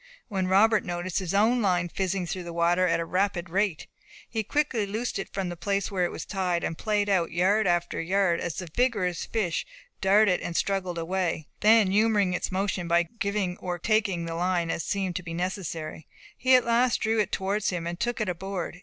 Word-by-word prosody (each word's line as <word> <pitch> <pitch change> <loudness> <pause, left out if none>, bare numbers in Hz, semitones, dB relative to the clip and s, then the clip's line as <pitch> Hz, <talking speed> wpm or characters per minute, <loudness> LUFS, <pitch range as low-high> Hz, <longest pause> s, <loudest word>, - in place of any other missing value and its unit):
when 190 -3 -1
Robert 210 +3 +4
noticed 175 0 -2
his 185 -3 -3
own 230 +4 +3
line 180 -4 +1
fizzing 185 +1 -2
through 185 +2 -4
the 175 -1 -7
water 170 +2 +2
at 165 - +1
a 170 - -2
rapid 185 -1 -1
rate. 190 -4 0 0.4
He 225 - -2
quickly 235 -2 0
loosed 220 +2 -3
it 195 - -6
from 195 -2 -3
the 175 - -5
place 200 +4 -1
where 185 -2 +1
it - - -3
was - - -6
tied, 180 -4 -1
and 165 - -2
payed 210 +2 0
out 185 -4 +2
yard 190 +5 +2
after 175 -1 0
yard 180 0 +1
as 175 - -3
the 180 - -5
vigorous 205 -9 +1
fish 190 -7 -1 0.4
darted 195 -1 +4
and 170 - -5
struggled 190 -3 -1
away; 170 -2 -1
then 215 -2 +5
humouring 205 -2 +3
its 180 - -2
motion 190 -2 -1
by 170 0 +4 0.2
giving 200 -3 -1
or 180 -1 -4
taking 200 -3 +1
the 165 - -4
line 175 0 0
as - - -2
seemed 190 -3 -2
to - - -4
be 165 -1 -6
necessary, 170 -4 -4 0.3
he 255 0 +4
at 250 - +4
last 235 +1 +3
drew 220 0 +1
it 210 - 0
towards 200 +2 0
him, 175 -2 -3
and 170 +1 -4
took 240 0 -1
it 215 - -1
aboard. 180 0 -4
190 Hz, 205 wpm, -27 LUFS, 175-205 Hz, 0.4 s, then